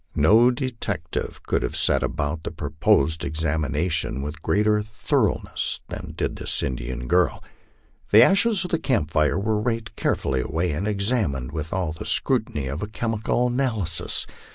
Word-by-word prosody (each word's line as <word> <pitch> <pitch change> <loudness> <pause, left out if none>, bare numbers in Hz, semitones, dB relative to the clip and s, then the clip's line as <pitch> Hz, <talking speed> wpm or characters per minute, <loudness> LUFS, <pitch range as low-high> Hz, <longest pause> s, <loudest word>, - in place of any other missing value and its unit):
No 110 +11 +5
detective 125 -1 -4
could - - 0
have - - -3
set - - +3
about 75 +2 -2
the - - -4
proposed 80 +3 +1
examination 80 -2 0
with 75 +2 -6
great 105 +5 +1
er 105 0 +3
thoroughness 105 0 -1
than - - -7
did - - -2
this - - 0
Indian 65 0 -4
girl. 90 0 +1 0.7
The 110 +3 +9
ashes 195 - +4
of 180 - -6
the 165 - +1
camp 100 - 0
fires 75 +1 +2
were 105 +2 0
raked 115 -1 -3
carefully 65 -1 0
away 80 +6 -1
and 85 +8 -2
examined 100 - 0
with 80 0 -5
all 90 -4 -1
the 80 - -8
scrutiny 110 - +1
of 70 +6 -4
a 105 - -3
chemical 115 +2 -1
analy 120 - 0
sis. 80 - +1
90 Hz, 160 wpm, -24 LUFS, 75-115 Hz, 0.7 s, The